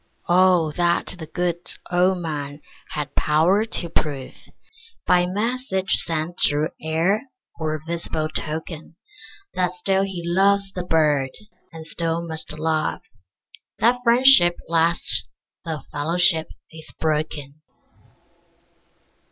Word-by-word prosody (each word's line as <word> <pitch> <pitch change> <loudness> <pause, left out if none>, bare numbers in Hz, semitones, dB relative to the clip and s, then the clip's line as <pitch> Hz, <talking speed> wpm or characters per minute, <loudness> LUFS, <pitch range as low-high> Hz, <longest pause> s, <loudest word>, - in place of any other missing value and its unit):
Oh 180 -3 +4
that 175 -1 +1
the 160 - -7
good 175 +1 -2 0.3
old 180 +1 +3
Man 145 -2 -5 0.3
had 145 -1 -4
power 170 +8 +2
to 185 -6 -2
prove, 140 -5 -2 0.7
By 180 0 +3
message 205 -1 -2
sent 165 +1 0
through 150 +2 +2
air 175 - 0 0.3
or 155 -1 -2
visible 165 -2 -3
token, 160 +1 -6 0.6
That 180 -1 0
still 190 +2 +1
he 190 -3 -3
loves 195 +3 +2
the 180 - -4
Bird, 150 -5 +2 0.4
and 160 -1 -10
still 165 +1 -3
must 160 -1 -6
love; 155 - -1 0.8
That 240 +4 +3
friendship 235 -7 +6
lasts 165 +1 +2 0.4
though 160 -2 -4
fellowship 165 +2 +3 0.2
is 160 -1 -11
broken! 150 -2 -2
165 Hz, 110 wpm, -22 LUFS, 155-185 Hz, 0.8 s, friendship